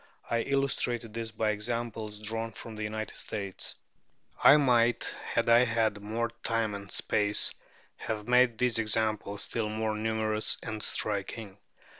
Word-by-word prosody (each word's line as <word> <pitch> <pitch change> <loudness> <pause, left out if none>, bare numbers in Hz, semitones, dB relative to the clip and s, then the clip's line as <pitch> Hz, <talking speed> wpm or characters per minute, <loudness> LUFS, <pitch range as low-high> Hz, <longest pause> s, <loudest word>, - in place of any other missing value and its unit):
I 115 - +2
illustrated 125 -3 0
this 115 0 -3
by 110 -1 0
examples 110 0 -3
drawn 115 +1 -2
from 115 - -7
the 110 - -6
United 110 0 -4
States. 100 -3 -5 0.7
I 145 - +9
might, 120 -4 +3
had - - -1
I 115 +1 +7
had 115 -3 +1
more 115 +3 -2
time 115 -2 0
and 100 -1 -7
space, 105 0 +1 0.4
have 105 -1 -4
made 125 -2 +4
these 125 -1 +1
examples 110 -2 -1
still 110 -2 -2
more 110 0 -1
numerous 110 0 0
and 110 -1 -4
striking. 105 0 -1
110 Hz, 140 wpm, -30 LUFS, 105-115 Hz, 0.7 s, I